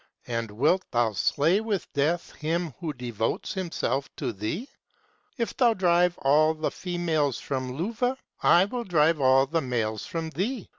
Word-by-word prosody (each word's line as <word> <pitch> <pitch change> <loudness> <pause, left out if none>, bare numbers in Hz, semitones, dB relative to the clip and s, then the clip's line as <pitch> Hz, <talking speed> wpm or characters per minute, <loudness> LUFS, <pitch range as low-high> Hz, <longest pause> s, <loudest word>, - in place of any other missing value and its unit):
260 115 -1 -1 0.2
And - - -16
wilt 175 +7 +3
thou 120 -2 +2
slay 155 - +2
with 210 -5 -3
death 160 +5 0
him 165 0 -2
who 165 -3 -3
devotes 120 -5 -3
him 185 -3 -4
self 140 -2 -1
to 130 -5 -3
thee? 110 - -4 0.7
If 230 -2 -2
thou 240 -3 +4
drive 175 -1 +3
all 155 +3 +3
the 155 0 -2
females 165 -7 -1
from 130 -5 -4
Luvah, 235 - -1 0.2
I 175 +2 +6
will 240 +4 -4
drive 160 -5 +2
all 130 0 +5
the 160 +4 0
males 115 -5 -2
from 165 -1 -4
thee. 215 +7 -3
160 Hz, 165 wpm, -26 LUFS, 135-180 Hz, 0.7 s, I